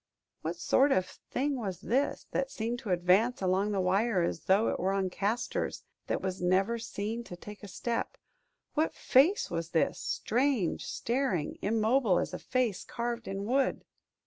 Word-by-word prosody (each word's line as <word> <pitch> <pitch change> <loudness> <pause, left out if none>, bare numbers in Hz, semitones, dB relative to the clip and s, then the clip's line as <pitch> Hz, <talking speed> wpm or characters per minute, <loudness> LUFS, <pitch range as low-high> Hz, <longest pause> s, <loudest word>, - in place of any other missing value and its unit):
What 165 +2 -3
sort 265 +11 +3
of 185 -7 +3
thing 275 +8 -3
was 195 -7 -4
this, 265 +5 0
that 270 0 0
seemed 235 -1 -3
to 235 -5 -7
advance 185 +7 +3
along 190 +2 +1
the 200 - 0
wire 190 +1 +2
as 170 - -2
though 200 +4 +4
it - - -2
were 190 +2 +1
on 190 -2 0
casters 205 +6 -2 0.2
that - - -1
was 190 -1 -3
never 195 +6 +2
seen 225 +1 -4
to 175 - -8
take 205 +4 -10
a 205 - -8
step? 235 - -3 0.6
What 315 +1 +1
face 315 +11 +3
was 165 -1 -2
this, 165 - +1
strange, 245 - 0
staring, 235 - -1
immobile 220 -1 +3
as - - -1
a - - -4
face 250 -7 0
carved 235 0 -4
in 195 +1 -3
wood? 265 +4 +1
210 Hz, 170 wpm, -30 LUFS, 185-245 Hz, 0.6 s, though